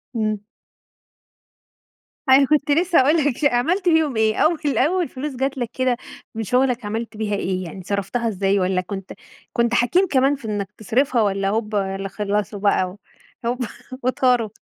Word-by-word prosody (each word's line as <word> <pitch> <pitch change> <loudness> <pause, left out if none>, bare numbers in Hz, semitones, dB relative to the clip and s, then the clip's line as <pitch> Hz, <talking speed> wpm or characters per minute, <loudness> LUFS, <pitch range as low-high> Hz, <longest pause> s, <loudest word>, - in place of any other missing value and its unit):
امم. 215 -1 0 1.9
أنا 270 +1 +7
كنت 295 0 +1
لسه 340 +2 +4
هاقول 295 +5 +4
لك 290 -1 0
عملت 345 +9 +1
بيهم 315 -6 +2
إيه؟ 220 0 +2
أول 310 -3 +1
أول 355 +2 +2
فلوس 265 +1 -5
جت 270 +2 -1
لك 240 -3 -2
كده 255 -2 +1 0.4
من 225 - -2
شغلك 250 0 +1
عملت 220 +1 -4
بيها 210 -2 -1
إيه 185 -1 -2
يعني 180 +3 -8
صرفتها 200 +5 -2
إزاي؟ 200 -1 +1
وألّا 185 0 +1
كنت 195 +1 -7 0.4
كنت 235 0 +1
حكيم 350 +11 +3
كمان 270 -1 +3
في 270 - -12
إنك 205 -2 -3
تصرفها، 245 +3 +1
والّا 195 -1 +1
هوبا 210 -3 -1
اللي 195 0 -4
خلصوا 205 +1 -2
بقى 195 -1 +1 0.5
هوبا 245 0 -1 0.4
وطاروا؟ 250 -3 +2
235 Hz, 155 wpm, -22 LUFS, 205-270 Hz, 1.9 s, أنا